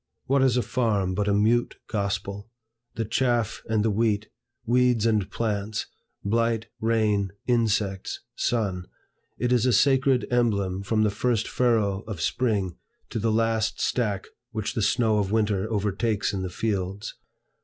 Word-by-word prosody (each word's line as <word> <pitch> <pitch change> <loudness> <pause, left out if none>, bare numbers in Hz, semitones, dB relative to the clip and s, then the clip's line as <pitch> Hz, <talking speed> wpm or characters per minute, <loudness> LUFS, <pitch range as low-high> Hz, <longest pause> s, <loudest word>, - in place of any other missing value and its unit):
What 135 +1 +2
is 130 -2 +3
a 125 - +2
farm 105 -7 0
but 105 +2 -1
a - - +3
mute 115 +4 +2
gospel? 100 0 -3 0.5
The 115 - -1
chaff 120 -1 0
and 110 -1 +2
the 110 - +2
wheat, 110 0 0 0.4
weeds 125 -1 +3
and 105 -4 +2
plants, 105 -1 -2 0.4
blight, 115 +1 +1
rain, 105 -4 +1
insects, 110 -5 0 0.2
sun, 95 -6 -1 0.5
it 125 +1 0
is 125 0 +3
a - - +4
sacred 135 +2 +3
emblem 100 -6 +1
from 110 +2 +1
the 105 - +2
first 115 +1 0
furrow 110 -6 +1
of 105 -6 -5
spring 100 -2 0 0.3
to - - -2
the 110 +1 +1
last 115 0 +1
stack 105 -6 0 0.2
which 110 -2 -3
the 115 - -1
snow 110 +1 +2
of 100 -1 -1
winter 105 -1 +1
overtakes 105 +1 0
in 95 - -2
the 95 - -3
fields. 100 0 -3
110 Hz, 150 wpm, -26 LUFS, 100-115 Hz, 0.5 s, a